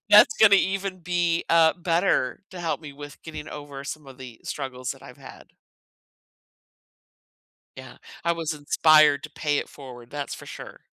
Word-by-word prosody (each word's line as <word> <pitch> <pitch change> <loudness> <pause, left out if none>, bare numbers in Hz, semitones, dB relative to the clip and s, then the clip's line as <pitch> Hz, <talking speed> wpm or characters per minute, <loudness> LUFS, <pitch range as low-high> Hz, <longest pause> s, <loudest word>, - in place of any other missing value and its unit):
that's 210 +1 +8
gonna 205 -2 +8
even 195 -1 -1
be, 175 -1 0
uh, 165 -1 +6
better 170 -5 0
to 185 - -8
help 165 -2 -2
me 150 -3 -9
with 145 0 -11
getting 155 -1 -8
over 145 -2 -8
some 150 0 -7
of 130 -1 -13
the 125 -3 -11
struggles 130 -2 -5
that - - -17
I've - - -12
had. - - -14 2.2
Yeah, 130 -1 -11 0.3
I 170 0 +2
was 165 -1 -3
inspired 150 0 +4
to - - -8
pay 145 -1 -1
it - - -2
forward, 125 -4 -12
that's 145 -1 -4
for - - -12
sure. - - -10
155 Hz, 165 wpm, -25 LUFS, 140-175 Hz, 2.2 s, that's